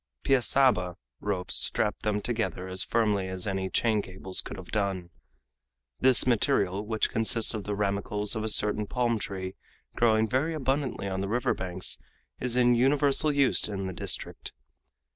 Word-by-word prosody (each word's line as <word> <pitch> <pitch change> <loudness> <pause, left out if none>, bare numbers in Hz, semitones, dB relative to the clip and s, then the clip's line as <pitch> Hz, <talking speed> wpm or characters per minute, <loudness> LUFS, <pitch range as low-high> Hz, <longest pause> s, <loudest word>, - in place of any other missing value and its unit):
"Piaçaba" 125 -8 +3 0.2
ropes 95 -3 -3
strapped - - 0
them 105 -1 -1
together 110 -5 -2
as 95 0 -1
firmly 105 -4 0
as 95 -1 -3
any 95 -2 -2
chain 110 0 +1
cables 95 -1 -3
could - - -8
have 95 -2 -10
done. 95 -4 -2 0.9
This 130 -1 +5
material, 100 -5 +1
which 110 -1 0
consists 115 +1 +3
of 110 -3 -5
the 105 - -2
ramicles 105 +1 0
of 110 - -2
a 110 - 0
certain 105 0 +2
palm 120 -2 0
tree 95 -2 -5 0.4
growing 110 -1 +3
very 140 +8 0
abundantly 135 -6 -1
on 95 0 -3
the 100 - -2
river 120 +2 +1
banks, 90 -1 -2 0.4
is 125 -1 -1
in 125 -1 +4
universal 140 +4 +3
use 140 -2 +2
in 100 -2 -4
the 95 - -4
district. - - -4
105 Hz, 160 wpm, -28 LUFS, 95-120 Hz, 0.9 s, This